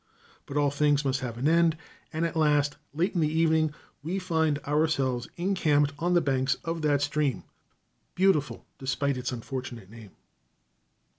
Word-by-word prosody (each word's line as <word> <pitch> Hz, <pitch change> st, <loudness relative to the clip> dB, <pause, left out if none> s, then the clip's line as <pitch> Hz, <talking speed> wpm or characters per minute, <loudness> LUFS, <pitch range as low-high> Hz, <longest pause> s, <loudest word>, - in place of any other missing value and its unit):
But 140 Hz, -, -4 dB
all 145 Hz, -1 st, +3 dB
things 145 Hz, 0 st, +2 dB
must 135 Hz, 0 st, +1 dB
have 120 Hz, -3 st, -5 dB
an 130 Hz, +5 st, 0 dB
end, 165 Hz, 0 st, +3 dB, 0.3 s
and 160 Hz, +2 st, -1 dB
at 165 Hz, -, -3 dB
last, 150 Hz, -2 st, +2 dB, 0.2 s
late 170 Hz, +7 st, 0 dB
in 175 Hz, -, 0 dB
the 155 Hz, -, +3 dB
evening, 160 Hz, -1 st, +2 dB, 0.3 s
we 170 Hz, +6 st, -3 dB
find 160 Hz, -5 st, +1 dB
ourselves 140 Hz, -5 st, 0 dB
encamped 155 Hz, -6 st, +2 dB
on 175 Hz, +2 st, +1 dB
the 175 Hz, -, +5 dB
banks 135 Hz, -2 st, +1 dB
of 165 Hz, 0 st, -2 dB
that 145 Hz, -2 st, +2 dB
stream, 145 Hz, -2 st, 0 dB, 0.7 s
beautiful 150 Hz, -10 st, +1 dB
despite 135 Hz, +1 st, -1 dB
its 125 Hz, 0 st, -3 dB
unfortunate 120 Hz, -4 st, -6 dB
name. 110 Hz, -4 st, -13 dB
145 Hz, 155 wpm, -27 LUFS, 135-160 Hz, 0.7 s, the